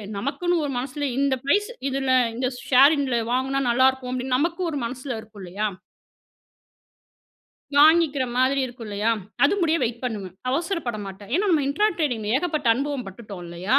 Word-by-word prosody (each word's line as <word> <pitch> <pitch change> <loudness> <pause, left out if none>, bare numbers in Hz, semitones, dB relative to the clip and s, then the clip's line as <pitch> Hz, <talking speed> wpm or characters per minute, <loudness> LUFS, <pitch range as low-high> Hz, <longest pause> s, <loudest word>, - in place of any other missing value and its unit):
நமக்குன்னு 320 - -1
ஒரு 280 - -3
மனசுல 275 +3 -3
"இந்த 275 -1 +2
பிரைஸ். 410 +9 +2 0.2
இதுல 270 0 -1 0.2
இந்த 255 +1 -1 0.2
ஷேரிங்ல 275 -1 +5
வாங்குனா 265 +2 0
நல்லா 260 +2 +5
இருக்கும்." 260 -1 -5
அப்படின்னு 255 0 -1
நமக்கு 335 +5 -1
ஒரு 290 - -3
மனசுல 255 +3 -5
இருக்கும். 215 -2 -14
இல்லையா. 195 +4 -2 2.1
வாங்கிக்கிற 300 -2 +5
மாதிரி 265 +2 +3
இருக்கும் 240 -2 -8
இல்லையா. 205 +2 -1 0.4
அது 290 - +4
முடிய 330 -1 +3
வெயிட் 235 +1 -2
பண்ணுவேன். 205 -7 -4 0.2
அவசரப்பட 325 - -2
மாட்டேன். 195 +2 -10
ஏன்னா 415 - +1
நம்ம 310 -4 +3
இன்ட்ரா 415 +10 +2
டிரேடிங் 245 -9 -1
ஏகப்பட்ட 305 -4 -1
அனுபவம் 275 -2 -3
பட்டுட்டோம் 195 -1 -9
இல்லையா. 180 +10 +1
260 Hz, 150 wpm, -24 LUFS, 230-290 Hz, 2.1 s, ஷேரிங்ல